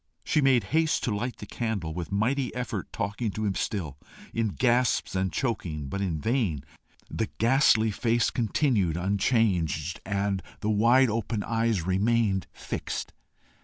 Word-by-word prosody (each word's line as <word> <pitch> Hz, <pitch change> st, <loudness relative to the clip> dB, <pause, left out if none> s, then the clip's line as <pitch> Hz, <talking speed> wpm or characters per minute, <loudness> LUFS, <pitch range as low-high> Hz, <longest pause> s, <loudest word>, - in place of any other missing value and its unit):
She 155 Hz, -, +2 dB
made 135 Hz, -4 st, +4 dB
haste 160 Hz, 0 st, +2 dB
to 110 Hz, -, 0 dB
light 120 Hz, +2 st, -3 dB
the -, -, -8 dB
candle, 100 Hz, -8 st, -3 dB
with 85 Hz, +2 st, -5 dB
mighty 125 Hz, +6 st, 0 dB
effort 120 Hz, -6 st, -4 dB
talking 105 Hz, +3 st, -2 dB
to 110 Hz, -, -2 dB
him 100 Hz, -, +1 dB
still, 80 Hz, -9 st, -3 dB, 0.3 s
in 115 Hz, -1 st, +1 dB
gasps 120 Hz, +3 st, +1 dB
and 95 Hz, -1 st, 0 dB
chokings, 80 Hz, -, -2 dB
but 100 Hz, -, -2 dB
in 85 Hz, -5 st, -1 dB
vain; 105 Hz, -, 0 dB, 0.5 s
the 110 Hz, -, -2 dB
ghastly 115 Hz, -2 st, +4 dB
face 115 Hz, +2 st, +1 dB
continued 110 Hz, -, +1 dB
unchanged, 90 Hz, -, +1 dB
and 100 Hz, -1 st, -1 dB, 0.2 s
the 105 Hz, -, 0 dB
wide 120 Hz, +4 st, +4 dB
open 110 Hz, -1 st, -2 dB
eyes 115 Hz, -6 st, 0 dB
remained 100 Hz, +1 st, +1 dB
fixed. -, -, -5 dB
110 Hz, 145 wpm, -27 LUFS, 95-120 Hz, 0.5 s, made